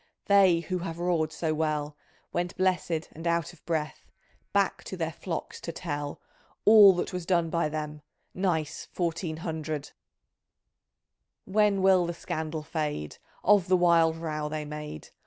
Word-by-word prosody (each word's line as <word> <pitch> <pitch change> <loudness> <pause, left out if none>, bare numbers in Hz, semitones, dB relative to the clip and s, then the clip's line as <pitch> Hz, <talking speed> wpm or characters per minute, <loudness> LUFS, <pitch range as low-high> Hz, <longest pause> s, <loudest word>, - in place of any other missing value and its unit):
They 190 -4 +5
who 180 +1 -3
have 170 -2 -5
roared 170 -3 0
so 160 -1 -1
well 150 -1 -1 0.4
Went 175 0 -2
blessed, 180 -3 0
and 165 +2 -6
out 170 0 0
of 170 - -20
breath, 155 -3 -3 0.4
Back - - +1
to - - -6
their - - -1
flocks - - -5
to - - -4
tell 145 0 -4 0.5
All 210 -2 +9
that 180 +2 -3
was 180 -1 -3
done 170 -2 +1
by 170 -2 +1
them 150 -1 -5 0.2
— - - -46
Nice 165 -5 -1
fourteen 170 -2 -2
hundred 155 -3 -4 1.6
I - - -11
When 205 -2 +3
will 185 -2 +5
the 170 - -3
scandal 160 -1 -4
fade 150 - -3 0.2
Of 200 -2 +5
the 185 0 +4
wild 165 -2 +4
row 155 -2 -3
they 155 0 -4
made 150 - -7
165 Hz, 155 wpm, -28 LUFS, 155-180 Hz, 1.6 s, All